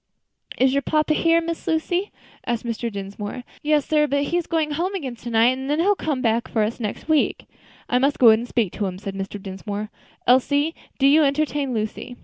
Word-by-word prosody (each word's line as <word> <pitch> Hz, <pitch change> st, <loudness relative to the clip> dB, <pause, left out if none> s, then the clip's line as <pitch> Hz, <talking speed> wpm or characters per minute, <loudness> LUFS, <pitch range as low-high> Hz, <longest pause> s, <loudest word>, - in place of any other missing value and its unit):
"Is 260 Hz, 0 st, +3 dB
your 280 Hz, -, +2 dB
papa 305 Hz, +2 st, +1 dB
here, 330 Hz, +1 st, +3 dB
Miss 335 Hz, 0 st, -5 dB
Lucy?" 350 Hz, +4 st, 0 dB, 0.4 s
asked 240 Hz, -1 st, -1 dB
Mr. 235 Hz, 0 st, -3 dB
Dinsmore. 205 Hz, +4 st, -6 dB, 0.2 s
"Yes, 295 Hz, -1 st, +2 dB
sir; 300 Hz, -1 st, +3 dB
but 280 Hz, 0 st, +1 dB
he's 345 Hz, +3 st, -1 dB
going 315 Hz, -2 st, 0 dB
home 350 Hz, +6 st, -1 dB
again 270 Hz, -10 st, -4 dB
to 240 Hz, -, -7 dB
night, 230 Hz, +2 st, +4 dB
and 265 Hz, +1 st, -6 dB
then 295 Hz, -, +1 dB
he'll 395 Hz, +5 st, +4 dB
come 295 Hz, -9 st, -2 dB
back 230 Hz, 0 st, +1 dB
for 220 Hz, -, 0 dB
us 220 Hz, +4 st, -2 dB
next 215 Hz, -3 st, -5 dB
week." 315 Hz, -2 st, +1 dB, 0.4 s
"I 250 Hz, -, +2 dB
must 275 Hz, +2 st, +2 dB
go 235 Hz, -3 st, +8 dB
in 220 Hz, -, +4 dB
and 240 Hz, -, -6 dB
speak 225 Hz, -7 st, 0 dB
to 205 Hz, -, -2 dB
him," 185 Hz, -1 st, -5 dB
said 195 Hz, 0 st, -6 dB
Mr. 195 Hz, +1 st, -5 dB
Dinsmore. 200 Hz, +2 st, -6 dB, 0.3 s
"Elsie, 285 Hz, +5 st, +3 dB, 0.2 s
do 275 Hz, -, +2 dB
you 290 Hz, +3 st, +6 dB
entertain 285 Hz, -1 st, 0 dB
Lucy." 220 Hz, +3 st, -4 dB
260 Hz, 210 wpm, -23 LUFS, 225-305 Hz, 0.4 s, go